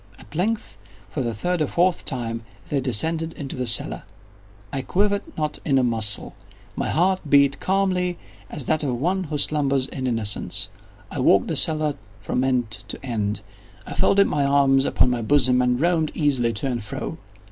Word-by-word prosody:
At 100 - -15
length, 185 - -2 0.3
for 145 - -3
the 120 -3 -2
third 175 - -1
or 150 - +2
fourth 175 +3 +1
time, 115 -4 -2 0.3
they 140 -2 0
descended 160 +7 +1
into 140 -2 -6
the 125 -1 -3
cellar. 115 -3 +1 0.7
I 135 - -1
quivered 200 +7 +1 0.2
not 150 -1 -2
in 140 -3 +2
a 130 - +3
muscle. 110 -4 0 0.4
My - - -2
heart 185 +3 +2
beat 140 -1 +4
calmly 185 -2 0 0.3
as 140 - -6
that 155 +3 +1
of 130 -5 -2
one 185 +6 0
who 150 -1 -3
slumbers 140 -3 +1
in 130 -1 -4
innocence. 115 -4 0 0.4
I - - -4
walked - - +4
the - - -1
cellar 155 -2 +2 0.3
from 115 +5 -1
end 125 -4 0
to 130 - -5
end. 105 -4 -2 0.4
I - - -6
folded 200 0 +4
my 145 -5 0
arms 140 -1 +3
upon 125 - +3
my 120 -1 -1
bosom, 125 0 +3
and 125 0 +1
roamed 165 -1 +2
easily 135 -6 +1
to 105 - -3
and 125 -4 -2
fro. 105 - -6
140 Hz, 180 wpm, -23 LUFS, 125-160 Hz, 0.7 s, beat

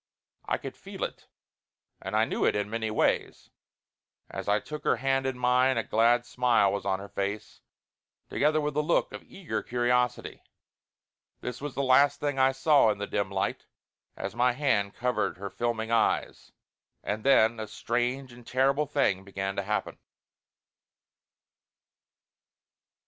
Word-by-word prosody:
I - - 0
could - - -8
feel - - -8
it, - - -6 0.7
and - - -4
I - - +4
knew - - -2
it - - +3
in 105 0 -2
many 110 -1 -2
ways. 110 - -1 0.8
As - - -5
I 105 +1 +3
took 150 +5 -8
her - - +3
hand 135 0 0
in 130 -1 -3
mine, 125 +1 +3
a 115 - +1
glad 120 +2 +3
smile 120 -5 +2
was 100 -1 -3
on 95 -1 +1
her 100 +1 -9
face, 100 +1 -4 0.7
together 155 +2 +1
with 150 -1 -2
a 150 - +2
look 155 +3 +1
of - - -7
eager 190 -4 -5
curiosity. 125 0 0 1.0
This 125 +1 -6
was 145 -2 -5
the 140 - -1
last 140 +2 +4
thing 145 -2 -2
I 130 0 +5
saw 135 -2 +4
in 105 - 0
the 100 - -3
dim 100 -1 -2
light, 95 0 -2 0.5
as 95 - -4
my 125 +1 +3
hand 110 -7 0
covered 120 -8 -1
her 100 +1 -6
filming 115 -1 -2
eyes. 115 - 0 0.5
And 105 +1 -3
then 115 -4 +4
a 110 - -4
strange 120 +4 -2
and 120 0 -14
terrible 135 +3 +2
thing 95 -10 +1
began 95 0 -4
to 100 - -1
happen. 105 +2 -3
120 Hz, 155 wpm, -28 LUFS, 105-135 Hz, 1.0 s, I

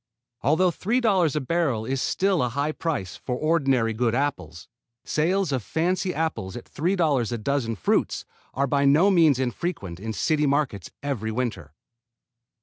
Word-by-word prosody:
Although 175 +6 +3
$3 195 - +1
a - - +2
barrel 135 -6 0
is 135 +2 -2
still 190 -3 +1
a 125 - +1
high 140 +5 -1
price 145 - -3
for 125 - -4
ordinary 135 -7 +1
good 115 +1 0
apples, 140 - -3 0.4
sales 180 +3 +1
of 130 -2 0
fancy 180 - -1
apples 155 - -3
at 120 - -9
$3 155 - 0
a 120 - -1
dozen 115 -1 -1
fruits 85 - 0 0.3
are 140 - +2
by 140 +1 +1
no 155 +8 +5
means 160 -7 +5
infrequent 125 - -3
in 110 +3 -6
the 110 - -4
city 150 - +1
markets 135 - -1
every 115 -6 -2
winter. 110 - -4
140 Hz, 155 wpm, -25 LUFS, 120-165 Hz, 0.4 s, no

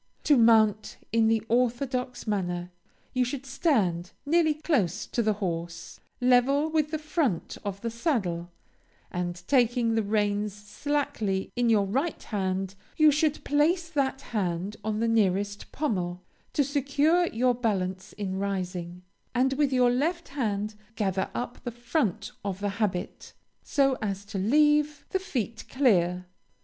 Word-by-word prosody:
To 295 - +5
mount 220 -3 +4
in 225 0 +3
the 225 -1 +2
orthodox 250 +2 0
manner, 180 -4 -2 0.4
you 255 -1 +2
should 255 +2 -4
stand 215 - 0
nearly 315 0 +3
close 225 - 0
to 235 - -1
the 215 -1 +2
horse, 170 -4 -5 0.2
level 260 +5 +3
with 310 -1 +1
the 315 - -1
front 300 - -1
of 200 -1 -4
the 230 - -2
saddle, 200 - -1 0.6
and 175 0 -3
taking 240 -3 +3
the 225 - +2
reins 205 -1 0
slackly 205 -3 -2
in 245 -1 +2
your 210 -3 +4
right 270 - -1
hand, 190 -2 -2 0.2
you 310 -1 +7
should 305 +1 +1
place 330 +4 +2
that 275 -3 0
hand 190 -1 -1
on 215 0 -1
the 230 - +2
nearest 205 -2 +1
pommel, 180 - -2 0.3
to 290 - +3
secure 290 +5 +2
your 250 0 +2
balance 190 -5 -2
in 190 -2 -3
rising, 180 -3 -3 0.3
and 260 +2 +3
with 285 0 +1
your 250 -2 +4
left 330 +7 -1
hand 215 -6 -2 0.2
gather 190 -3 0
up 245 0 -4
the - - -3
front 235 - -1
of 195 -2 -3
the 205 0 -1
habit, 185 -4 -2 0.3
so 275 -2 +2
as 200 -1 -3
to 200 -1 -4
leave 295 +6 +3
the 380 - +1
feet 235 - -4
clear. 180 -9 +2
225 Hz, 145 wpm, -27 LUFS, 195-275 Hz, 0.6 s, you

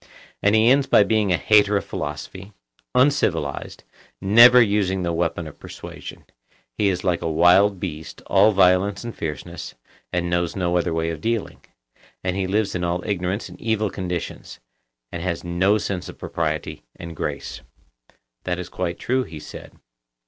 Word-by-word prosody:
And 100 +1 +3
he 110 +1 +4
ends 135 +2 +4
by 105 - +6
becoming 105 -1 +1
a 90 - +3
hater 105 -1 +4
of - - -4
philosophy, 95 +2 -6 0.4
uncivilized, 100 - 0 0.4
never 115 +6 +7
using 100 -4 +2
the 85 -1 -1
weapon 85 0 -1
of 75 - -11
persuasion,—he 105 - -8
is 90 -2 -2
like 90 -3 0
a 80 - -2
wild 90 +5 +4
beast, 80 -4 -7
all 100 +2 +4
violence 95 +1 +3
and 120 -1 -6
fierceness, 80 +2 -6 0.4
and 90 -1 -1
knows 85 -1 -1
no 90 -2 0
other 90 0 +1
way 80 0 -1
of 80 -2 -7
dealing; 115 -2 -2 0.6
and 90 0 -1
he 95 -1 -1
lives 100 +1 0
in 90 - -3
all 90 +1 -1
ignorance 95 +1 -2
and - - -14
evil 110 -2 0
conditions, 90 -8 -5 0.5
and 85 - -5
has 85 -1 -3
no 90 +4 +2
sense 95 -3 -4
of - - -11
propriety - - -3
and 85 -1 -9
grace. - - -5 0.8
That 90 -1 -2
is 90 - -6
quite 90 -2 -3
true, 130 +1 0
he 80 -9 -9
said. 75 - -11
95 Hz, 165 wpm, -22 LUFS, 85-105 Hz, 0.8 s, never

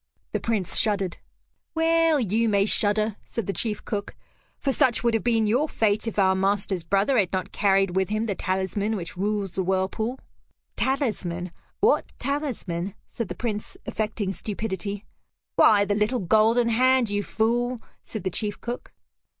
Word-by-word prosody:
The - - -1
Prince 215 -6 -1
shuddered. 200 -5 0 0.6
"Well 325 -1 +3
you 225 0 +1
may 200 -1 +3
shudder," 215 0 +2
said 230 - -4
the 195 - -2
chief 215 -2 +1
cook, 205 -2 -4 0.4
"for 275 - -1
such 245 -2 +3
would 235 -1 +2
have 225 - +1
been 230 -2 +3
your 255 +9 +1
fate 215 0 +1
if 225 - -4
our 190 -2 +4
master's 195 -1 0
brother 200 +9 +2
had 190 -4 +1
not 185 -1 -2
carried 195 -2 +2
with 190 0 +1
him 215 +1 0
the 210 - -1
talisman 190 +3 -1
which 175 -4 -6
rules 200 0 -2
the 190 - -1
whirlpool." 190 +6 -1 0.6
"Talisman? 200 - -1 0.3
What 440 +4 +3
talisman?" 220 - -3
said 230 - -4
the - - -6
Prince 215 -3 -4
affecting 210 -2 -2
stupidity. 200 -1 -4 0.5
"Why 205 -2 +6
the 205 - 0
little 210 +5 +1
golden 220 +5 +3
hand, 255 -1 +3
you 205 0 0
fool," 240 +4 0 0.2
said 215 -5 -6
the 185 - -1
chief 205 +2 0
cook. 240 +1 -6
210 Hz, 160 wpm, -25 LUFS, 195-230 Hz, 0.6 s, Why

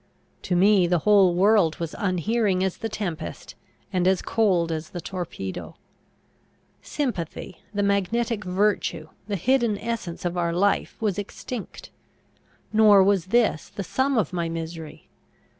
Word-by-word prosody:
To 180 - -1
me 190 0 +5
the 175 0 +2
whole 195 -4 +5
world 195 -3 +4
was 165 -2 -4
unhearing 195 0 0
as 190 -2 -1
the 225 - -4
tempest, 175 -7 -5 0.4
and 180 -1 +2
as 190 -1 +2
cold 185 -7 +1
as 160 0 -4
the 175 - -6
torpedo. 170 - -6 1.1
Sympathy, 190 - -4
the 205 -1 -1
magnetic 210 +3 0
virtue, 185 -4 0 0.2
the 205 - -2
hidden 235 +2 +1
essence 215 -7 -5
of 175 0 -2
our 170 -1 0
life, 200 +4 +1
was 205 -4 -1
extinct. 210 +2 -7 0.8
Nor 210 -3 +7
was 190 -3 +2
this 225 -6 +1
the 200 - -6
sum 260 +9 0
of 190 -5 0
my 170 -2 -1
misery. 165 -1 -7
190 Hz, 140 wpm, -24 LUFS, 175-215 Hz, 1.1 s, Nor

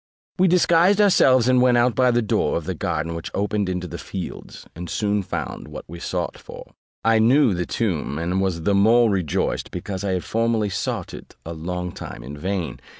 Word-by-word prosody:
We 185 - +5
disguised 180 +2 +4
ourselves 130 - +5
and 130 -1 +4
went 125 -1 +4
out 120 0 +3
by 125 +3 +3
a 120 0 +2
door 105 - 0
of - - -5
the - - -2
garden 80 +2 -2
which 85 0 -6
opened 105 -1 -1
into 90 0 -3
the 85 0 -7
fields, 90 +1 -7
and 85 +1 -7
soon 105 -1 0
found 95 - -5
what - - -9
we 85 +2 -9
sought - - -3
for. - - -12 0.3
I 115 0 +4
knew 125 +1 +4
the 90 -1 -2
tomb, 85 -10 -2
and 90 +4 -1
was 90 -4 -1
the 100 - +2
more 110 +3 +4
rejoiced, 90 -6 -1
because 95 -1 -5
I 95 -2 0
had 90 - -2
formerly 115 -2 0
sought - - -3
it - - -11
a 85 - -5
long 90 +2 -4
time - - -9
in 70 +4 -8
vain. 90 +2 -3
100 Hz, 205 wpm, -22 LUFS, 90-120 Hz, 0.3 s, We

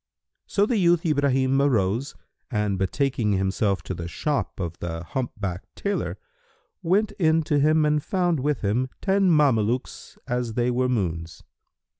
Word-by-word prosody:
So 200 - +2
the 230 +1 0
youth 175 -3 +3
Ibrahim 135 -3 +2
arose 120 -1 +1 0.3
and 105 -5 -1
betaking 110 +2 0
himself 95 +1 0
to - - -4
the 85 -1 -5
shop 145 - -2
of 85 -3 -4
the 85 -1 -4
humpbacked 100 -3 -5
tailor, 200 0 -2 0.6
went 195 +5 +2
in 160 -2 +3
to 145 -1 +1
him 155 +2 +3
and 150 -1 +1
found 175 -5 0
with 145 +2 -1
him 115 +6 0
ten 195 -1 +2
Mamelukes 125 -7 +1
as 120 -2 -2
they 120 0 +1
were 125 +1 +1
moons. 85 -8 -2
130 Hz, 145 wpm, -24 LUFS, 100-155 Hz, 0.6 s, youth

